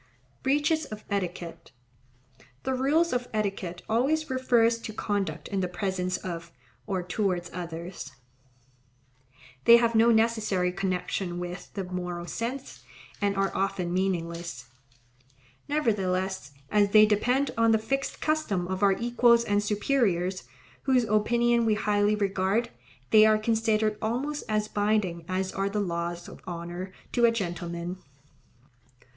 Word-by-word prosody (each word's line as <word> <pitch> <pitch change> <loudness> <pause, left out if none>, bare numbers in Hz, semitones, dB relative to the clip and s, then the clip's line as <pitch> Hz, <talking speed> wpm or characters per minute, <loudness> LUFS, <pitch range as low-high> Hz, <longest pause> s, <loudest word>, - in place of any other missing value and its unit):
Breaches 295 +3 +1
of 215 0 -9
etiquette.—The 130 - -7
rules 290 +6 +2
of 245 0 -1
etiquette 195 -4 -2
always 275 +7 +1
refer 250 -3 +3
to 230 -1 -2
conduct 195 -8 -2
in 200 - -1
the 185 - 0
presence 185 0 -2
of, 170 -2 -6 0.4
or 190 -3 -1
towards 180 -2 -1
others. 170 -4 -6 1.5
They 235 - +9
have 235 -1 +2
no 225 +1 +5
necessary 220 -5 +2
connection 185 -1 -2
with 180 +1 -6
the 195 - -2
moral 180 -1 -4
sense, 245 +8 -5 0.4
and 200 -1 +1
are 195 0 +1
often 190 -3 -1
meaningless. 170 -8 -2 1.0
Nevertheless 190 - 0 0.2
as 205 -1 +4
they 215 +1 +7
depend 245 +6 +1
on 230 0 +3
the 225 - +5
fixed 270 +5 -2
custom 305 - 0
of 190 +1 -3
our 200 -1 +5
equals 235 +1 +3
and 205 -2 +1
superiors, 205 -4 0 0.4
whose 260 -3 +3
opinion 235 +2 +2
we 220 -2 +2
highly 210 0 +2
regard, 200 +2 0 0.4
they 215 -1 +8
are 215 0 +5
considered 215 -1 +1
almost 275 +7 -2
as 215 0 +1
binding 205 -5 0
as 185 0 -1
are 195 +1 -1
the 210 +1 -2
laws 170 -2 -3
of - - -12
honour 175 +2 -5 0.2
to 240 -1 +3
a 230 - +5
gentleman. 175 -3 -4
200 Hz, 130 wpm, -27 LUFS, 180-230 Hz, 1.5 s, They